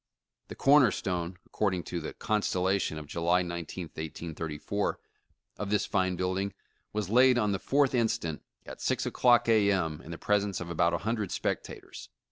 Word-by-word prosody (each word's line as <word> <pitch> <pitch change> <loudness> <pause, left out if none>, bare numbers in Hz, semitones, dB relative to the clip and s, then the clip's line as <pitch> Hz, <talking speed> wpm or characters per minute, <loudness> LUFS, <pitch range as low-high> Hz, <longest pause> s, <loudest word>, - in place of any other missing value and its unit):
The - - -8
corner 140 -2 +6
stone," 90 -2 -3
according 95 -4 -1
to 85 - -4
The 80 - -6
Constella 95 -2 +1
tion" 80 - -2
of 75 - -7
July 85 +4 +1
19th, 85 0 -5
1834, 80 +4 -4 0.6
of 105 - -3
this 105 0 +1
fine 95 -2 0
building 95 +2 -1 0.4
was 105 -1 -3
laid 125 +1 +6
on 105 -3 +2
the 100 - -1
4th 140 -1 +2
instant, 115 -10 0 0.2
at - - -9
6 - - 0
o'clock 120 -1 +4
A. 110 -3 +4
M., 80 -5 -1
in - - -12
the 85 - -5
pres 105 +2 +2
ence 100 -3 -3
of 85 -1 -6
about 85 +1 +2
a 85 - -5
hundred 110 -4 -1
spectators. - - -4
95 Hz, 175 wpm, -29 LUFS, 85-105 Hz, 0.6 s, corner